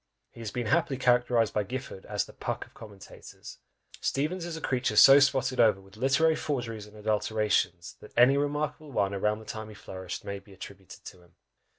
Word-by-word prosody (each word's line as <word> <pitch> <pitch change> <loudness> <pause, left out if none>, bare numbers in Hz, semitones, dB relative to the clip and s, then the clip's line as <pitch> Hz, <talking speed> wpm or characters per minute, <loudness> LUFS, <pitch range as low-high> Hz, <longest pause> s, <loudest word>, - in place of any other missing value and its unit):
He - - -15
has 115 -2 -5
been 120 +3 -4
happily 150 +2 +1
characterised 120 -3 +2
by 105 - +1
Gifford 105 -2 -7
as 105 -1 -1
"the - - -15
Puck - - -4
of - - -24
Commentators!" 100 -4 -12 0.4
Steevens 165 +6 -1
is 165 -2 -5
a - - -6
creature 125 -6 -1
so 135 +7 +9
spotted 135 -2 +1
over 110 -4 +5
with 95 +1 -18
literary 135 +7 +2
forgeries 115 -9 -4
and 105 +1 -16
adulterations, 105 -4 -1
that - - -14
any 125 +3 +6
remarkable 145 +1 -2
one 100 -5 0
about 105 +2 0
the 110 - -12
time 110 0 -7
he 105 - -11
flourished 95 -3 -8
may 100 0 -5
be 100 0 -18
attributed 95 -1 -12
to 90 - -11
him. 85 -1 -24
110 Hz, 195 wpm, -28 LUFS, 100-135 Hz, 0.4 s, so